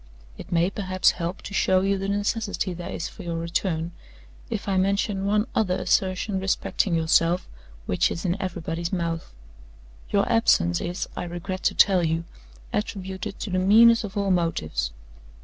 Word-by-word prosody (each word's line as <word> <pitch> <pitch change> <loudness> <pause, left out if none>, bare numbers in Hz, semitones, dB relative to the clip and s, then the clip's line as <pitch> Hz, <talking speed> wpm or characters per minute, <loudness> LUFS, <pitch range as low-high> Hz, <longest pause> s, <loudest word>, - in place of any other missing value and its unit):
"It - - -11
may, 175 +2 +2
perhaps, 185 -2 +2
help 175 +1 -5
to - - -8
show 185 -1 +3
you 195 0 +1
the 195 - -3
necessity 205 -1 -1
there 175 0 -7
is - - -4
for - - -11
your 170 -1 -3
return, 170 0 -1 0.6
if 225 -4 -4
I 195 - +1
mention 195 +1 +1
one 210 +1 +2
other 185 -5 +1
assertion 190 +1 0
respecting 190 -1 0
yourself, 165 +2 +2 0.4
which 90 - +2
is 165 - -5
in 175 -1 +1
everybody's 170 -2 -3
mouth. 170 -3 -2 0.8
Your 200 -1 +2
absence 85 - +3
is, 175 +2 -3
I - - -3
regret 175 +2 -5
to - - +2
tell 190 -3 +5
you, 165 0 0 0.5
attributed 195 -1 -4
to 210 - -4
the 185 - +1
meanest 230 +5 +6
of 205 0 -6
all 200 -1 +1
motives. 80 - 0
185 Hz, 165 wpm, -25 LUFS, 170-200 Hz, 0.8 s, meanest